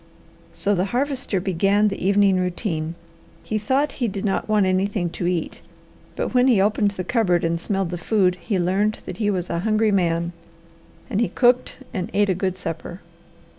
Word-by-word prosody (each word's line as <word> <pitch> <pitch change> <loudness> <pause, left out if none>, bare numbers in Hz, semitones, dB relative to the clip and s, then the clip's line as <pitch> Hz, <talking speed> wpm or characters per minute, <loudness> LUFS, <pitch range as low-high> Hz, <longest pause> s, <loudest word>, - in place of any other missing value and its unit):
So 205 - 0
the 185 -1 +1
Harvester 255 -2 -1
began 195 +3 +2
the 195 - -5
evening 200 0 +4
routine. 175 -3 -2 0.5
He 215 - -2
thought 265 +8 +1
he 240 - +2
did 200 0 -4
not 195 +2 -1
want 210 -2 +3
anything 185 -1 0
to 175 - -3
eat, 175 -3 -2 0.5
but - - -3
when 250 0 +4
he 240 -6 +4
opened 205 +1 +2
the 195 -2 -5
cupboard 180 -4 +1
and 165 0 0
smelled 195 0 -2
the 175 - -4
food 190 -1 +2
he 205 -4 -1
learned 195 +4 +1
that - - -6
he 210 -2 0
was 185 -3 -1
a 170 - -1
hungry 215 +2 +2
man 170 -3 +1 0.8
and 225 -3 -1
he 235 - +1
cooked 245 0 +2 0.2
and 185 -4 -3
ate 205 0 +3
a - - +3
good 185 0 -2
supper. 165 0 -6
195 Hz, 185 wpm, -22 LUFS, 180-215 Hz, 0.8 s, evening